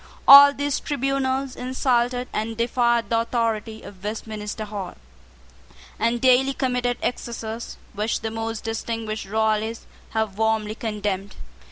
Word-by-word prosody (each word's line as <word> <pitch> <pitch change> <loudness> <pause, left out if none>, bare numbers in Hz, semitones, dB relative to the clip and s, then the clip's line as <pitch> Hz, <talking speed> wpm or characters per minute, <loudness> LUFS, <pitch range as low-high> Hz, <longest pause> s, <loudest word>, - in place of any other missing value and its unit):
All 280 +1 +11
these 285 0 -2
tribunals 270 -1 -1
insulted 250 -1 0
and 220 +1 -3
defied 235 -2 +1
the 230 - +3
authority 230 -2 -2
of 195 -2 -12
Westminster 215 0 -5
Hall, 200 -3 -6 1.0
and 235 +1 +1
daily 260 +2 +4
committed 250 -2 0
excesses 230 -1 -4 0.2
which 210 +2 -1
the 220 -1 -3
most 225 0 -4
distinguished 225 -2 -4
Royalists 220 +1 0 0.3
have 220 -2 -2
warmly 220 -1 +1
condemned. 205 -3 -3
225 Hz, 120 wpm, -23 LUFS, 215-250 Hz, 1.0 s, All